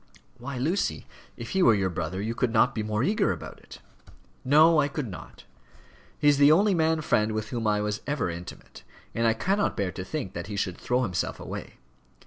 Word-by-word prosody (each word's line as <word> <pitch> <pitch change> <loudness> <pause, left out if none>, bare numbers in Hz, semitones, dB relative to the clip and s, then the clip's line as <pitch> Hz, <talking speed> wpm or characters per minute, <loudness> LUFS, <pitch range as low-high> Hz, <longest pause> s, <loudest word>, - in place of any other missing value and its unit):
"Why, 130 +2 -6
Lucy, 165 +11 -1 0.3
if - - -7
he 190 - +1
were 115 -9 +6
your 95 -2 0
brother 85 +2 -4
you 110 +3 -2
could 120 0 0
not 110 -1 +3
be 110 - -2
more 105 +1 -1
eager 210 +7 +2
about - - -7
it." - - -13 0.7
"No, 155 +4 +5
I 145 - +3
could 145 -2 -4
not. 95 - -10 0.7
He 150 - +1
is 145 -1 +5
the 145 +1 +7
only 200 +5 +4
man 160 -2 +1
friend 110 -6 +1
with 110 0 -3
whom 115 -2 -2
I 105 0 +2
was 105 0 -2
ever 145 -9 -1
intimate, 85 +1 -9 0.3
and 115 0 +1
I 115 - +2
cannot 195 - 0
bear 100 -3 -1
to 90 - -6
think 135 -1 -5
that 85 0 -6
he 105 - -5
should 95 -3 -3
throw 125 +1 0
himself 90 -7 -2
away. - - -7
115 Hz, 210 wpm, -26 LUFS, 105-150 Hz, 0.7 s, the